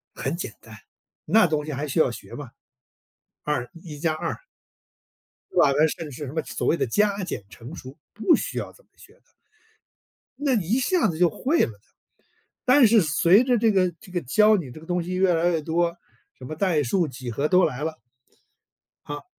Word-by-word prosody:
很 - - -3
简 - - -5
单， - - -13 0.5
那 220 -3 +5
东 155 -2 0
西 155 - -5
还 145 +2 -3
需 150 +4 -1
要 145 - +4
学 120 - -10
吗？ 145 -5 -8 0.9
二 130 -5 -1
一 150 -4 -9
加 160 0 0
二 165 +1 -3 1.2
对 - - -7
吧， 140 - +5
那 155 +1 +5
甚 165 +1 -5
至 - - -11
是 145 +3 -7
什 135 - -7
么 160 - -1
所 - - -4
谓 170 - +3
的 - - 0
加、 205 - +1
减、 110 - -5
乘、 120 +7 -11
除， 130 -3 -10 0.2
不 275 - +3
需 - - -4
要 - - -4
这 - - -22
么 - - -40
学 - - -17
的。 - - -29 1.2
那 280 -3 +1
你 180 -6 -1
一 240 +6 +2
下 355 +6 +2
子 160 - -3
就 175 -1 +4
会 290 - 0
了 - - +1
的。 100 -1 -19 0.8
但 255 0 +6
是 220 -1 +5
随 170 +7 +4
着 250 -2 +2
这 225 0 +3
个 185 -2 +2
这 200 -4 -15
个 175 -2 -2
教 210 - +4
你 140 -9 -6
这 155 - -11
个 160 - -14
东 175 0 -1
西 180 +2 -5
越 185 -1 +3
来 170 +2 +2
越 165 -3 0
多， 170 +2 0 0.4
什 130 - -11
么 155 - -6
代 165 -4 +1
数、 170 +6 +1
几 130 -2 -7
何 140 +6 0
都 185 +2 +4
来 135 +4 -1
了 160 0 -4 1.1
好 145 - -8
170 Hz, 230 characters per minute, -24 LUFS, 150-200 Hz, 1.2 s, 但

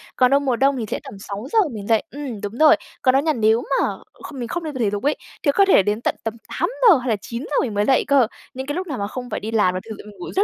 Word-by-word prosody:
Còn 255 0 +4
đâu 280 - +5
mùa 265 -4 0
đông 270 +2 +2
thì 230 - -3
sẽ - - -1
tầm - - -10
6:00 210 - -2
mình 205 -1 -7
dậy 225 -2 +3
ừm, 265 -7 -6
đúng 205 +3 -5
rồi. 310 +1 +7 0.3
Còn 255 - +4
đó 270 - +4
nha 310 +2 +1
nếu 225 0 +2 0.2
mà - - +2 0.4
kh - - -11
mình 245 -3 -4
không 345 +8 -4
đi 310 - -4
tập 260 - -6
thể 220 - +2
dục 205 +2 -4
ấy, 290 - +2 0.3
thì 285 - +4
có 395 - +5
thể 370 - +5
đến 210 +3 -1
tận - - 0
tầm 225 - -2 0.3
8:00 470 -7 +4
hay 250 0 -4
là 220 - +3
9:00 245 +7 -5
mình 235 -6 -2
mới 205 0 +1
dậy 265 - +3
cơ. 275 -5 +4 0.3
Những 265 +1 -5
cái 290 - -2
lúc 370 +1 -3
nào 280 -5 -4
mà 200 - -2
không 250 +3 -7
phải - - -3
đi 220 - -5
làm 210 -5 +2
là 185 - -2
thực 220 - -5
sự - - -11
mình 210 - -12
ngủ 175 - -7
rất 395 - +4
250 Hz, 315 wpm, -21 LUFS, 215-285 Hz, 0.4 s, rồi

